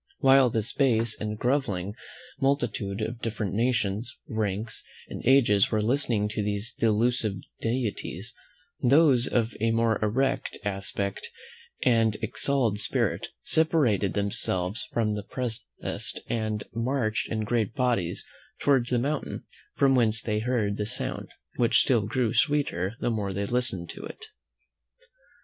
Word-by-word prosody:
While 135 -1 +6
this 110 +1 -1
base 115 -5 +2
and 105 0 -3
grovelling 110 -7 0 0.5
multitude 120 -7 0
of 115 +2 -4
different 105 -4 -2
nations, 115 -1 0 0.2
ranks, 110 0 -2 0.3
and - - -7
ages 115 -7 +5
were 110 - +1
listening 115 -2 +2
to 105 0 -2
these 105 +2 -2
delusive 115 -1 +1 0.2
deities, 115 -3 -3 0.5
those 135 -2 +5
of 115 -2 0
a 115 - +3
more 115 -1 +2
erect 135 +6 0
aspect 100 0 -3 0.5
and 115 -3 +3
exalted 115 -2 0
spirit - - 0 0.2
separated 140 - +3
themselves 100 +1 -1
from 110 -2 +1
the 110 +3 -4 0.3
rest, - - -4
and 110 -2 -2
marched 115 -2 -1
in 110 -1 -1
great 110 0 0
bodies 115 -10 0 0.3
towards 130 -4 +3
the 125 - +2
mountain 140 +5 -2 0.3
from 135 -1 +4
whence 115 -3 +3
they 105 -3 -1
heard 110 -3 0
the 105 - -2
sound, - - -3 0.3
which 120 -2 +4
still 115 -6 +2
grew 115 0 0
sweeter 135 - +1
the 120 - +1
more 100 -3 -2
they 100 +1 -1
listened 120 -7 -1
to - - -9
it. 445 - -9
115 Hz, 130 wpm, -27 LUFS, 105-125 Hz, 0.5 s, While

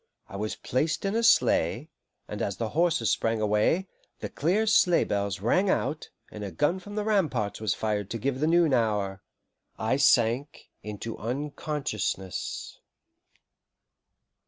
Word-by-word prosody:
I - - -10
was 105 +2 -3
placed 155 +8 -1
in 195 - 0
a 230 - +2
sleigh, 230 - +3 0.4
and - - -6
as - - -2
the - - -2
horses 165 -10 +1
sprang 115 0 0
away, 110 - +1 0.3
the - - -5
clear 190 +9 +1
sleigh 180 -5 +4
bells 100 -1 -2
rang 185 - +2
out, 155 -4 -1 0.2
and 105 - -7
a 100 - -4
gun 150 - 0
from 205 +3 -10
the 210 - -1
ramparts 155 - 0
was 110 -3 0
fired 105 -2 -2
to 115 - -3
give 130 +3 -2
the 155 - +1
noon 165 -3 +4
hour, 105 -5 0 0.6
I 110 +4 0
sank 130 0 +2
into 105 +2 -6
unconsciousness. 130 - -4
125 Hz, 145 wpm, -27 LUFS, 105-165 Hz, 0.6 s, sleigh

